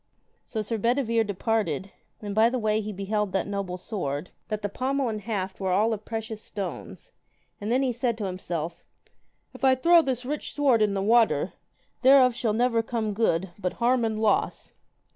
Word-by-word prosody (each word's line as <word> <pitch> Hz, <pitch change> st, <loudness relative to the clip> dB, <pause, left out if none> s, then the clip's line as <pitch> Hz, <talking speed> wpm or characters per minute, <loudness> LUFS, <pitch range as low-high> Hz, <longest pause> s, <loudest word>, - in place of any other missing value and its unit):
So 220 Hz, -2 st, -3 dB
Sir 225 Hz, +1 st, -3 dB
Bedivere 230 Hz, 0 st, +2 dB
departed, 200 Hz, -, -1 dB, 0.3 s
and 205 Hz, -1 st, -4 dB
by 220 Hz, +2 st, +5 dB
the 255 Hz, -, -1 dB
way 215 Hz, -2 st, +1 dB
he 215 Hz, 0 st, -5 dB
beheld 200 Hz, 0 st, -2 dB
that 195 Hz, -, +1 dB
noble 200 Hz, -3 st, -3 dB
sword, 175 Hz, -6 st, -4 dB, 0.2 s
that 215 Hz, -1 st, -4 dB
the -, -, +1 dB
pommel 260 Hz, +5 st, -1 dB
and 215 Hz, -1 st, -4 dB
haft 195 Hz, -4 st, -3 dB
were 190 Hz, -1 st, -1 dB
all 215 Hz, +5 st, +3 dB
of 210 Hz, 0 st, -6 dB
precious 220 Hz, -1 st, -5 dB
stones, 200 Hz, -4 st, -7 dB, 0.5 s
and 210 Hz, +2 st, -2 dB
then 260 Hz, +3 st, +3 dB
he 255 Hz, -2 st, 0 dB
said 235 Hz, -1 st, -1 dB
to 210 Hz, -, -3 dB
himself, 175 Hz, -3 st, -4 dB, 0.7 s
If -, -, -13 dB
I 260 Hz, -1 st, +6 dB
throw 335 Hz, +6 st, +6 dB
this 255 Hz, -4 st, -2 dB
rich 295 Hz, +3 st, -4 dB
sword 270 Hz, -6 st, +3 dB
in 205 Hz, -2 st, +2 dB
the 195 Hz, -, -1 dB
water, 230 Hz, +2 st, +3 dB, 0.5 s
thereof 260 Hz, -1 st, +6 dB
shall 230 Hz, -2 st, -1 dB
never 235 Hz, 0 st, +2 dB
come 225 Hz, -2 st, -2 dB
good, 190 Hz, -4 st, +1 dB
but 180 Hz, -3 st, -2 dB
harm 245 Hz, 0 st, +2 dB
and 220 Hz, -1 st, -1 dB
loss. 220 Hz, -1 st, 0 dB
220 Hz, 185 wpm, -26 LUFS, 200-240 Hz, 0.7 s, I